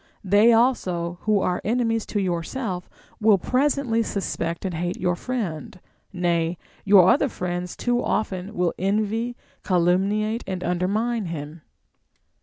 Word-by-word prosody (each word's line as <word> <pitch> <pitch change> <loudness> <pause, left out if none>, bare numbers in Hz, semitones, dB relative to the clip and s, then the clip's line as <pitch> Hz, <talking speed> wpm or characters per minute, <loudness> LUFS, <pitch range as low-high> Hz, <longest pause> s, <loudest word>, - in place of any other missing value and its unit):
They 205 +4 +5
also 180 -8 +1
who 210 -2 +3
are 180 - 0
enemies 225 0 0
to 205 - -1
yourself 180 +2 -3 0.3
will 215 -2 +5
presently 255 +1 +1
suspect 185 -5 -3
and 185 - -2
hate 175 +2 -3
your 180 -1 +1
friend; 185 - -4 0.3
nay, 170 -2 0 0.3
your 195 -3 +6
other 275 +2 +2
friends 180 -3 -4
too 245 - -1
will 240 - 0
often 185 -3 -1
envy, 215 +5 0 0.3
calumniate, 195 +5 +1
and 185 -1 -4
undermine 205 +6 0
him. 155 0 -6
195 Hz, 125 wpm, -24 LUFS, 175-225 Hz, 0.3 s, your